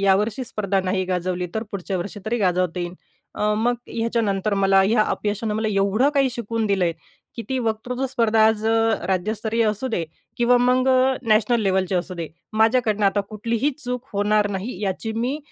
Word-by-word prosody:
यावर्षी 205 +5 +2
स्पर्धा 200 -4 -1
नाही 185 0 0
गाजवली, 180 0 -2
तर 220 - -1
पुढच्या 195 -1 -3
वर्षी 200 +3 -6
तरी 240 +2 0
गाजवता 180 -3 +1
येईन." 175 0 -4 0.4
अ, 210 0 +1
मग 240 +2 +1
ह्याच्यानंतर 215 -3 0
मला 195 0 +4
ह्या 215 +3 +3
अपयशानं 210 +1 -2
मला 220 0 0
एवढं 200 +6 +2
काही 270 -2 +3
शिकवून 230 -2 -2
दिलंय, 190 -4 +1 0.4
की 230 - -4
ती 260 -1 -1
वक्तृत्व 245 +3 -2
स्पर्धा 225 -3 +2
आज 220 0 +1
अ, 225 - +3 0.3
राज्यस्तरीय 215 +4 0
असू 215 +5 -2
दे 180 -8 -1 0.3
किंवा 245 +1 +4
मग 255 +1 +3
अ, 260 0 +4
नॅशनल 225 +2 +3
लेव्हलची 190 -1 +1
असू 180 +1 -2
दे, 165 -2 -5 0.2
माझ्याकडनं 220 -1 +2
आता 205 +1 +2
कुठलीही 230 +6 -1
चूक 250 +1 -4
होणार 205 +1 +2
नाही, 195 +1 -4
याची 205 +3 -2
मी 245 +6 -1
215 Hz, 175 wpm, -22 LUFS, 195-235 Hz, 0.4 s, मला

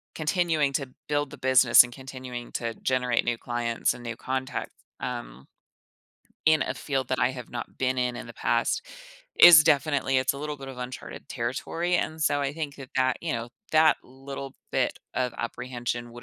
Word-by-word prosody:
continuing 155 -3 +1
to 135 -1 -1 0.2
build 145 -1 0
the - - -9
business, 130 -1 +7
and 120 -1 -9
continuing 130 -2 -8
to 115 -1 -2
generate 125 -2 0
new 120 -1 0
clients 120 -1 -1
and 120 - -11
new 115 0 -4
contacts, 130 0 -3 0.3
um 120 - -6 1.0
in 155 -2 +5
a - - -3
field 130 +1 -2
that 130 - 0
I - - +3
have 125 -3 -8
not 120 - -7
been 130 0 +1
in 125 -1 0
in - - -7
the 115 - -10
past - - 0 0.5
is 165 -3 +10
definitely 140 -2 +2
it's 130 +1 +1
a - - -6
little 150 0 -4
bit 135 0 -8
of 135 - -8
uncharted 125 0 -7
territory, 150 +8 -2
and, 160 -2 -2
so, 145 -1 +2
I 140 0 -1
think 150 -2 -5
that 135 -2 -10
that 130 0 +2
you 170 - -1
know, 115 0 -3 0.2
that 155 0 +6
little 135 +1 -8 0.2
bit - - 0 0.2
of 125 -2 0
apprehension 120 0 -4
would 120 0 -11
130 Hz, 185 wpm, -27 LUFS, 120-145 Hz, 1.0 s, is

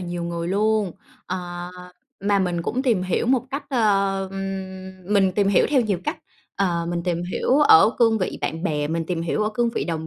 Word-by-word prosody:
nhiều 175 -1 -4
người 170 0 -3
luôn. 210 0 +1 0.3
Ờ, 175 -1 -5 0.5
mà 200 0 +3
mình 175 -3 -1
cũng 250 +8 -2
tìm 230 -9 +2
hiểu 185 +4 -1
một 255 -1 +3
cách, 280 +1 -4
ờ, 195 -5 +1
ừm 190 -1 -6
mình 195 -2 +3
tìm 200 +1 +1
hiểu 200 - +4
theo 280 -3 +4
nhiều 210 -6 0
cách. - - -2 0.4
Ờ, 170 -4 0
mình 170 0 -2
tìm 170 -1 -1
hiểu 265 - +2
ở 225 - +7
cương 225 -2 +4
vị 185 - -3
bạn 160 +1 -3
bè, 150 -6 -1
mình 165 +1 -1
tìm 170 -2 -2
hiểu 170 +5 -1
ở 215 - 0
cương 240 0 +1
vị - - -1
đồng 160 -2 -3
190 Hz, 210 wpm, -23 LUFS, 175-215 Hz, 0.5 s, ở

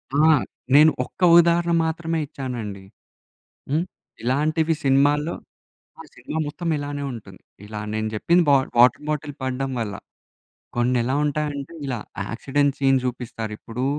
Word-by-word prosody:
ఆ! - - +2 0.6
నేను 155 +2 +8
ఒక్క 125 - -15 0.2
ఉదాహరణ 170 0 +4
మాత్రమే 165 0 -2
ఇచ్చానండి. 120 -9 -6 0.9
హ్మ్. 155 +4 +1 0.4
ఇలాంటివి 155 +6 +1
సినిమాల్లో 145 +4 +3 0.7
ఆ - - -6
సినిమా 160 - -5
మొత్తం 165 +3 -5
ఇలానే 145 0 -4
ఉంటుంది. 100 -5 -11 0.3
ఇలా 105 0 -6
నేను 110 0 -1
చెప్పింది 170 +11 +3
బ - - +6 0.3
వాటర్ 125 +4 +5
బాటిల్ 150 -1 -3
పడడం 130 +1 -2
వల్ల. 105 -3 -3 0.8
కొన్ని 125 +1 +2
ఎలా 130 +3 -1
ఉంటాయంటే, 150 0 -3
ఇలా 125 -3 -2 0.3
యాక్సిడెంట్ 140 +4 0
సీన్స్ 135 -2 +3
చూపిస్తారు 120 -3 -5
ఇప్పుడు 120 +2 -5
140 Hz, 130 wpm, -23 LUFS, 125-155 Hz, 0.9 s, నేను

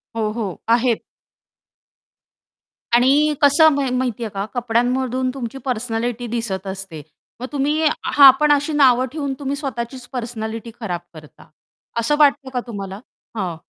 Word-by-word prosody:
हो, 215 -1 -1
हो 210 -6 -5
आहेत. 235 0 +2 1.9
आणि 280 +5 +4
कसं 300 +3 +6
म 280 -1 0
माहितीये 240 -3 -2
का? 195 0 -4
कपड्यांमधून 250 +2 0
तुमची 260 -1 -6
पर्सनॅलिटी 240 0 -2
दिसत 210 -5 -3
असते. 190 -5 -6 0.4
मग - - -3
तुम्ही 295 +3 0 0.2
हां. 275 -2 +8
पण 300 -1 +3
अशी 290 +2 +2
नावं 260 -3 +4
ठेवून 285 -3 -3
तुम्ही 280 0 -2
स्वतःचीच 255 -2 -5
पर्सनॅलिटी 230 -1 -5
खराब 175 -6 -4
करता. 155 -2 -15 0.5
असं 295 +6 +1
वाटतं 275 -2 +3
का 250 - 0
तुम्हाला? 195 -3 -6 0.4
हां. 180 -5 -2
245 Hz, 130 wpm, -20 LUFS, 220-275 Hz, 1.9 s, हां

